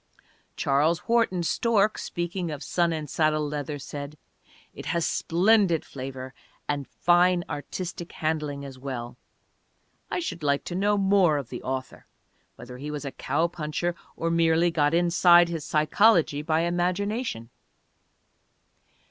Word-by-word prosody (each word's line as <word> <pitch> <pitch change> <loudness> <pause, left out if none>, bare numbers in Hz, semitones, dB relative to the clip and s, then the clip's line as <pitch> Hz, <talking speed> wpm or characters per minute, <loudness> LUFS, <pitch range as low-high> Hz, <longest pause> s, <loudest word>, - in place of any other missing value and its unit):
Charles 155 +7 +1
Wharton 230 -7 +2
Stork 215 +3 +1
speaking 175 0 -3
of 150 -2 -6
Sun 170 -1 +1
and 155 -2 -3
Saddle 155 +1 +1
Leather, 145 0 -4
said, 145 +1 -7 0.6
"It - - -9
has 170 -2 0
splendid 185 -1 +2
flavor 130 -1 -7 0.3
and 145 -2 -2
fine 175 0 +3
artistic 175 +3 -6
handling 150 -3 -2
as 135 -2 -10
well. 125 -3 -6 0.9
I - - -1
should 325 - -4
like 140 -1 +1
to - - -6
know 205 +3 +1
more 190 -5 +3
of 140 -5 -5
the 125 - -6
author, 130 -1 -5 0.5
whether 125 +1 -10
he 145 +2 -6
was 150 -1 -5
a 140 - -4
cow 145 +6 -1
puncher 170 +1 -3 0.2
or 165 0 -1
merely 165 +1 +3
got 150 -1 +2
inside 175 0 +5
his 165 -3 -4
psychology 155 0 +3
by 155 +1 +1
imagination." 175 - -1
165 Hz, 135 wpm, -26 LUFS, 145-175 Hz, 0.9 s, inside